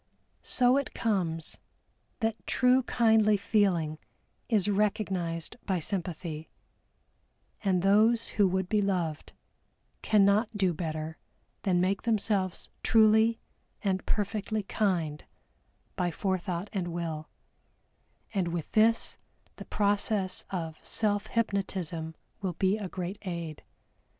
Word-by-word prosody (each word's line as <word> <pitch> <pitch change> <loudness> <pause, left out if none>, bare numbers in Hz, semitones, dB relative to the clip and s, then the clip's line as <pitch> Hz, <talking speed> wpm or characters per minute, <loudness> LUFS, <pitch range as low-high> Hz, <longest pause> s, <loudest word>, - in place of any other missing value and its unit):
So 250 +1 +3
it 280 - -2
comes 175 -7 -1 0.6
that 225 0 -2
true 255 +1 +4
kindly 220 -4 +4
feeling 180 -7 +1 0.5
is 210 -4 +3
recognized 195 -5 -1
by 190 -2 +1
sympathy, 165 -3 -4 1.1
and 185 -3 +2
those 220 +4 +4
who 205 -3 +3
would 190 0 0
be 210 +2 +2
loved, 175 -6 -1 0.7
cannot 210 +1 +3
do 190 -3 +2
better 160 -1 -4 0.4
than 180 -3 +2
make 190 +2 +1
themselves 205 -5 0
truly 220 +1 +5 0.5
and 190 -2 0
perfectly 210 +1 -1
kind 175 -8 -1 0.7
by 180 -1 0
forethought 185 +1 -2
and 185 -4 -1
will, 165 -2 -4 1.0
and 190 -4 0
with 170 -2 -4
this 225 +1 +3 0.4
the - - -8
process 205 -2 0
of 165 -4 -5
self 205 -2 0
hypnotism 185 -7 -2 0.3
will 190 -3 -2
be 190 +4 +2
a 205 -4 -5
great 185 +2 -5
aid. 170 -5 -5
195 Hz, 110 wpm, -29 LUFS, 175-215 Hz, 1.1 s, truly